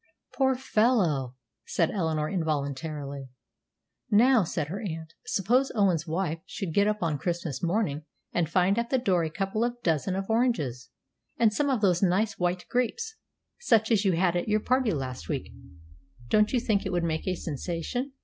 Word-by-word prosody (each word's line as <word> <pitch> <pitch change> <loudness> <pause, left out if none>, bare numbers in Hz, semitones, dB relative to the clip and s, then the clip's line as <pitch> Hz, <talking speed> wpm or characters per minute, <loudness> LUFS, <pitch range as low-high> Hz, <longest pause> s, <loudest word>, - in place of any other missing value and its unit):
"Poor 265 +1 +2
fellow!" 210 - +1 0.3
said 165 - 0
Eleanor, 160 -5 0
involuntarily. 145 -4 -3 0.8
"Now," 235 +2 +5
said 160 -3 -3
her 195 +5 -4
aunt, 160 -5 -6
"suppose 245 +8 +2
Owen's 185 -6 +2
wife 165 0 -1
should 180 -5 -5
get 200 +3 +3
up 210 -2 -1
on 155 -4 0
Christmas 170 -3 -3
morning 170 -4 0 0.3
and 170 -3 +1
find 190 +4 +3
at 235 0 -2
the 265 - +2
door 190 -9 +2
a 160 - -1
couple 195 +6 -1
of 240 0 -2
dozen 165 +2 +1
of 195 0 -3
oranges, 155 - 0 0.5
and 225 -2 +4
some 285 +6 +1
of 255 -5 +1
those 180 -4 +3
nice 200 +3 +1
white 180 0 0
grapes, 445 - -1 0.5
such 225 - +3
as 215 -2 +4
you 190 -3 +3
had 175 +1 +2
at 175 - -1
your 210 0 +3
party 255 0 +2
last 130 - -4
week; - - -3 0.8
don't 210 0 +4
you 255 - +2
think 215 -4 +1
it 190 - -3
would 175 -1 0
make 160 0 -2
a 185 - +1
sensation?" 175 - -4
185 Hz, 175 wpm, -27 LUFS, 160-225 Hz, 0.8 s, Now